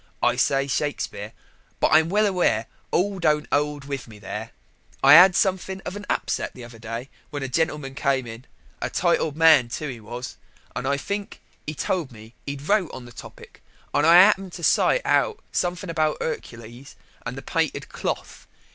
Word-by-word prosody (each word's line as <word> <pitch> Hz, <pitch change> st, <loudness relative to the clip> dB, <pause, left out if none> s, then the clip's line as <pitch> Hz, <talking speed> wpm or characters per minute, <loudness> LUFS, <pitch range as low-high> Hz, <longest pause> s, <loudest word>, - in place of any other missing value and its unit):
I -, -, +3 dB
say 135 Hz, 0 st, +2 dB
Shakespeare, 135 Hz, -7 st, -3 dB, 0.5 s
but -, -, +3 dB
I'm 160 Hz, +1 st, +5 dB
well 210 Hz, +3 st, +3 dB
aware 180 Hz, -, +1 dB, 0.2 s
all 195 Hz, +1 st, 0 dB
don't 150 Hz, -3 st, +1 dB
'old 145 Hz, -1 st, 0 dB
with 140 Hz, -4 st, -5 dB
me 110 Hz, -2 st, -13 dB
there 105 Hz, +2 st, -6 dB, 0.5 s
I -, -, +8 dB
'ad 180 Hz, +3 st, +9 dB
something 190 Hz, 0 st, 0 dB
of 180 Hz, -, -6 dB
an 205 Hz, 0 st, -8 dB
upset -, -, -2 dB
the 125 Hz, -, -10 dB
other 120 Hz, -1 st, -12 dB
day 115 Hz, +3 st, -6 dB, 0.2 s
when 145 Hz, -2 st, -5 dB
a -, -, -2 dB
gentleman 150 Hz, -1 st, -1 dB
came 135 Hz, -2 st, 0 dB
in 115 Hz, +2 st, -9 dB, 0.4 s
a -, -, -1 dB
titled 150 Hz, -2 st, 0 dB
man, 160 Hz, -7 st, +6 dB
too, 150 Hz, +5 st, -4 dB
he 125 Hz, -3 st, -7 dB
was, 120 Hz, +3 st, -8 dB, 0.4 s
and 135 Hz, -, -3 dB
I 140 Hz, +1 st, +1 dB
think 200 Hz, +8 st, -5 dB, 0.3 s
he 155 Hz, -, -4 dB
told 160 Hz, -1 st, -2 dB
me 110 Hz, 0 st, -14 dB
he'd 140 Hz, +1 st, -6 dB
wrote 200 Hz, -5 st, +2 dB
on 130 Hz, -, -9 dB
the 120 Hz, -, -12 dB
topic, -, -, -13 dB, 0.3 s
and -, -, +2 dB
I 165 Hz, -, +8 dB
'appened 195 Hz, -1 st, +5 dB
to 170 Hz, -, -8 dB
cite -, -, +3 dB
out 435 Hz, -, +2 dB
something 180 Hz, 0 st, -2 dB
about 155 Hz, -2 st, 0 dB
'Ercules 120 Hz, -3 st, -7 dB, 0.3 s
and -, -, -6 dB
the -, -, -7 dB
painted -, -, -1 dB
cloth. -, -, -5 dB
145 Hz, 180 wpm, -24 LUFS, 125-175 Hz, 0.5 s, ad